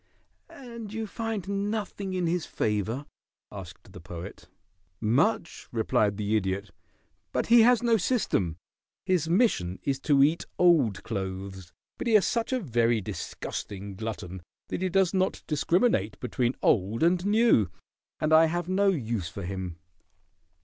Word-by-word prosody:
"And 235 -5 -9
you 225 0 -3
find 220 -3 -4 0.2
nothing 205 -3 -3
in 180 -1 0
his 170 0 -1
favor?" 110 +6 -1 0.5
asked 95 -1 -10
the 90 - -9
Poet. 85 -1 -9 0.5
"Much," 145 - 0
replied 110 -3 +1
the 105 0 0
Idiot, 95 -1 -1 0.6
"but - - 0
he 235 0 +8
has 245 +1 +5
no 230 -1 +4
system. 175 - 0 0.5
His 180 -4 +1
mission 170 - +2
is 135 -1 -1
to 140 -1 +4
eat 155 +4 +2
old 155 - +3
clothes, 95 -1 -5 0.3
but - - -3
he 225 - +4
is 205 - +6
such 230 0 -1
a 260 - +1
very 120 - +1
disgusting 100 0 -6
glutton 95 -4 -6 0.3
that - - -3
he 185 - 0
does 190 0 +2
not 190 0 0
discriminate 155 - +1
between 125 0 -1
old 105 +5 +2
and 175 +1 +3
new, 205 - +4 0.5
and 155 +1 +1
I 160 +1 +8
have 175 +1 -2
no 195 +2 +2
use 115 - -1
for 95 +4 -7
him. 90 -2 -5
140 Hz, 145 wpm, -27 LUFS, -, 0.6 s, he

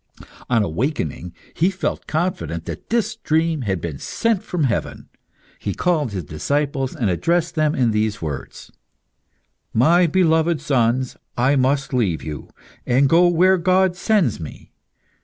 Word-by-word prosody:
On 115 -4 +3
awaking, 90 - -3 0.2
he 175 +4 +2
felt 190 0 -3
confident 160 - -2
that - - -8
this 230 0 0
dream 160 -3 0
had 95 -6 -1
been 80 -4 -5
sent 230 -4 0
from 175 -4 -2
heaven. 120 -7 -2 0.5
He 100 - -3
called 155 -9 0
his 95 -3 -4
disciples, 135 - -2
and 115 - -1
addressed 170 - 0
them 155 -1 +1
in 120 -3 +2
these 105 -1 0
words 75 -4 -7 1.0
"My 170 +9 +5
beloved 160 -1 +2
sons, 125 -1 0 0.2
I 130 +4 +3
must 135 +1 +1
leave 100 -11 0
you, 75 -1 -7 0.3
and 130 +3 +3
go 170 +4 +5
where 180 +2 +4
God 185 +1 +2
sends 190 - +1
me. 80 -4 -10
140 Hz, 140 wpm, -21 LUFS, 110-175 Hz, 1.0 s, My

